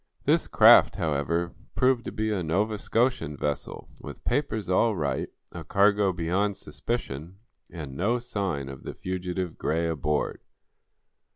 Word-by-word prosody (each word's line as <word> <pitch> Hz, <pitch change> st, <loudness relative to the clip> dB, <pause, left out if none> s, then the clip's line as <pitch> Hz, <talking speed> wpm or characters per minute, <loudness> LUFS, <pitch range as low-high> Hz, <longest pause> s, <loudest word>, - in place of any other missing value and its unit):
This -, -, +3 dB
craft, -, -, +7 dB
however, 85 Hz, +3 st, -1 dB, 0.2 s
proved 125 Hz, -2 st, +2 dB
to -, -, -4 dB
be 110 Hz, +1 st, -1 dB
a 100 Hz, -3 st, 0 dB
Nova 100 Hz, +6 st, 0 dB
Scotian 115 Hz, -, 0 dB
vessel, 75 Hz, 0 st, -3 dB
with -, -, -9 dB
papers 115 Hz, -7 st, -1 dB
all 105 Hz, +4 st, +3 dB
right, 75 Hz, -5 st, -1 dB, 0.2 s
a -, -, -7 dB
cargo 100 Hz, 0 st, +3 dB
beyond 95 Hz, +4 st, 0 dB
suspicion 90 Hz, -, -5 dB, 0.3 s
and 75 Hz, -6 st, -7 dB
no 105 Hz, -, +1 dB
sign 100 Hz, -, -3 dB
of 70 Hz, -1 st, -8 dB
the -, -, -7 dB
fugitive 90 Hz, -1 st, -4 dB
Gray 85 Hz, +1 st, 0 dB
aboard. 75 Hz, -2 st, -1 dB
90 Hz, 135 wpm, -27 LUFS, 80-105 Hz, 0.3 s, craft